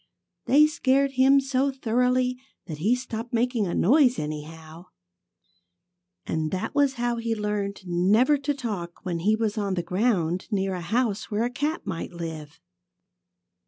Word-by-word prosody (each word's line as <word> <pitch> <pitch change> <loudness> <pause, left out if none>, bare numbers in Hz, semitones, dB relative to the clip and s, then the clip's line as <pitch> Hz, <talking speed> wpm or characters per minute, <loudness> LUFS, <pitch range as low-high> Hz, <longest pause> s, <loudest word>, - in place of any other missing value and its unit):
They 295 +4 +6
scared 275 -2 +1
him 270 +1 +5
so 270 0 0
thoroughly 250 0 0 0.3
that 155 -3 -7
he 215 +10 +2
stopped 240 -2 -6
making 235 -3 +1
a 175 - -2
noise, 255 - +4
anyhow. 155 +2 -7 1.4
And 160 -1 -2
that 185 +2 -3
was 285 -2 +2
how 240 0 -1
he 230 -1 -2
learned 210 -2 -3
never 205 +11 +3
to 285 +1 -1
talk 205 -10 -6
when 175 -2 -2
he 210 +6 +2
was 220 -1 -1
on 200 -2 -1
the 175 - -2
ground 185 -4 0
near 195 -3 -1
a 180 - -4
house 215 +3 -1
where 210 +1 0
a 240 - -1
cat 295 +6 -2
might 180 -2 -5
live. 160 -2 -7
220 Hz, 155 wpm, -25 LUFS, 180-255 Hz, 1.4 s, They